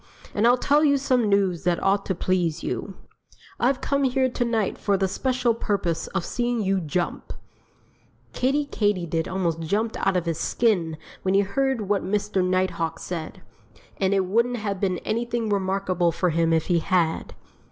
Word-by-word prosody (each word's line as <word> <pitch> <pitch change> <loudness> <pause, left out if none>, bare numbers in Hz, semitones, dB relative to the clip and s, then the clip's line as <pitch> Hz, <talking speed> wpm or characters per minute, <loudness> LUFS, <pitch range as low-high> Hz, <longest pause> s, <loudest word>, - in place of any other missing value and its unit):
"And 210 +3 +3
I'll 245 +1 +5
tell 290 +4 +3
you 285 -2 +4
some 255 -5 +1
news 195 -4 +1
that 175 -1 0
ought 195 +1 +1
to 190 - 0
please 175 -3 0
you: 195 - -4 0.6
I've 255 +2 +1
come 280 0 0
here 260 0 +2
to 245 - -1
night 225 -4 -1
for 200 -1 +1
the 190 0 +1
special 255 +3 0
purpose 195 -7 -1
of 190 -3 -3
seeing 240 -1 -1
you 195 0 +1
jump!" 170 +2 -3 1.0
Kiddie 280 +3 +1
Katydid 180 - -1
almost 175 -4 -1
jumped 210 +8 -1
out 195 -1 +1
of 175 - -1
his 165 -1 -2
skin 180 -9 +1 0.2
when 190 +1 +1
he 200 - +5
heard 265 +4 0
what 200 -1 0
Mr. 205 0 0
Nighthawk 180 -3 0
said. 165 -3 -6 0.5
And 195 0 +1
it 190 -1 +2
wouldn't 235 +6 +1
have 200 -3 -3
been 185 -2 0
anything 235 0 -1
remarkable 190 -3 +1
for 180 +1 0
him 165 +1 +2
if 160 -1 +2
he 175 -2 +2
had. 170 -1 0
195 Hz, 175 wpm, -24 LUFS, 180-235 Hz, 1.0 s, I'll